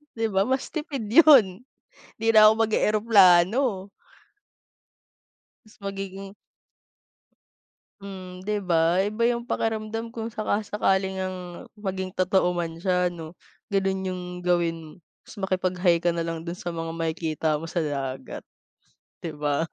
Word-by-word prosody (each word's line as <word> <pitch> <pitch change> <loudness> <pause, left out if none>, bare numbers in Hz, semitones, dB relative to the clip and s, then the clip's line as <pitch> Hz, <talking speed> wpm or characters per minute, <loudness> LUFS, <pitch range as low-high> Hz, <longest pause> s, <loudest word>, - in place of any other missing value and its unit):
'Di 225 -2 -1
ba 195 +2 +1
mas 265 +1 -1
tipid 275 -9 -5
yun, 250 - +6 0.6
hindi 225 - -5
na 215 -1 +8
ako 215 - +7
mag 225 - 0
e-eroplano. 205 0 +4 1.8
Mas 215 - -21
magiging 195 0 -6 1.7
Hmm 185 -2 -9
'di 210 +1 -1
ba? 170 -1 +2
Iba 215 +3 -2
yung 235 0 -4
pakiramdam 225 0 -3
kung 225 -1 -5
saka-sakali 210 -3 -1
ngang 185 0 -3 0.4
maging 190 -2 -4
totoo 185 0 +1
man 170 -2 -3
siya 180 +1 +1
ano, 165 -2 -7 0.4
ganon 195 -1 0
yung 185 -1 -4 0.2
gawin 175 -2 +1
mo, 155 - -12 0.3
tas - - -13
makipag-hi 185 -2 +1
ka 175 - +3
nalang 165 -1 -3
dun 170 +1 -6
sa 175 -1 -5
mga 165 0 -4
makikita 160 -1 -2
mo 165 +2 -6
sa 175 - -1
dagat. 135 -4 -4 0.8
Di 170 - -4
ba? 150 +2 -1
190 Hz, 130 wpm, -25 LUFS, 170-210 Hz, 1.8 s, na